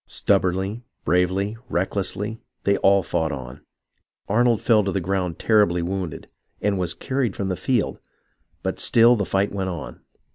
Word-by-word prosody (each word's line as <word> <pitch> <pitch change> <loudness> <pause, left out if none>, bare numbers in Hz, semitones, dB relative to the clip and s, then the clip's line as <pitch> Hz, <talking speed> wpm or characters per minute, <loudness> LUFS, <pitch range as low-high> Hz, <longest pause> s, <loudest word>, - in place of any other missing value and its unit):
Stubbornly, 95 +5 0 0.2
bravely, 95 +5 +1
recklessly, 100 +4 -2 0.2
they 100 - +3
all 100 0 +4
fought 80 -1 -1
on. 65 -3 -7 0.7
Arnold 120 +1 +3
fell 110 -3 +3
to 100 - -1
the 95 - 0
ground 90 -2 -2
terribly 105 -6 +3
wounded, 90 -3 -4 0.3
and 100 -2 0
was 90 -1 -1
carried 130 -6 -2
from 100 -1 -2
the 95 - -1
field, 125 +2 -1 0.6
but - - -2
still 120 +1 +6
the 100 -3 -1
fight 100 +2 0
went 95 -1 -2
on. 90 - -7
95 Hz, 150 wpm, -23 LUFS, 90-105 Hz, 0.7 s, still